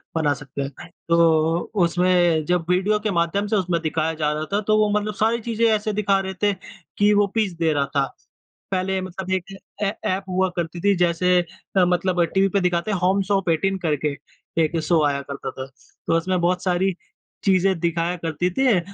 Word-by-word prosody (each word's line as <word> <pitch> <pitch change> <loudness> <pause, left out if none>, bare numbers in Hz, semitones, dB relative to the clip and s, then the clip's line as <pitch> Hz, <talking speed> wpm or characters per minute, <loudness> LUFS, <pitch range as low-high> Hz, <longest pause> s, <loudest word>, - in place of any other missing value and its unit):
बना 155 -3 +2
सकते 140 -1 -7
हैं। 140 +4 -7 0.2
तो 165 -1 +3 0.2
उसमें 175 -2 +2
जब 175 0 0
वीडियो 190 +4 +2
के 210 0 -2
माध्यम 170 +3 0
से 215 - 0
उसमें 180 -4 0
दिखाया 160 0 -1
जा 155 -1 -1
रहा 155 +1 -3
था 205 - +2
तो 215 0 +4
वो 215 -1 +3
मतलब 210 0 -4
सारी 225 +3 +1
चीज़ें 230 0 0
ऐसे 215 -1 +1
दिखा 200 -1 +2
रहे 190 0 -4
थे 205 -1 +4 0.4
कि 205 +1 +4
वो 205 0 +3
पीस 215 -5 +1
दे 165 -2 +2
रहा 140 -1 +1
था। 140 -1 +3 0.7
पहले 190 0 0
मतलब 185 0 -6
एक 190 +1 -3 0.3
ऐ 200 - +1 0.2
ऐप 190 +1 -1
हुआ 185 +1 +1
करती 170 0 -3
थी 200 +1 +3
जैसे 180 +1 +3 0.4
अ, 185 - +6
मतलब 180 0 +1
टीवी 195 0 +3
पे 200 - +1
दिखाते 180 +2 0
हैं 200 - 0
होम 190 +2 +2
शॉप 195 -2 +1
एटीन 190 +4 +1
करके 150 -2 -1 0.5
एक 160 +1 0
शो 160 -1 +2
आया 140 -1 0
करता 140 -1 -6
था। 130 0 -7 0.4
तो - - +2
उसमें 180 +2 0
बहुत 180 +1 +1
सारी 185 0 +1 0.5
चीज़ें 190 -2 +2
दिखाया 170 +1 0
करती 165 +1 -2
थीं 250 -4 +3
180 Hz, 195 wpm, -22 LUFS, 165-195 Hz, 0.7 s, अ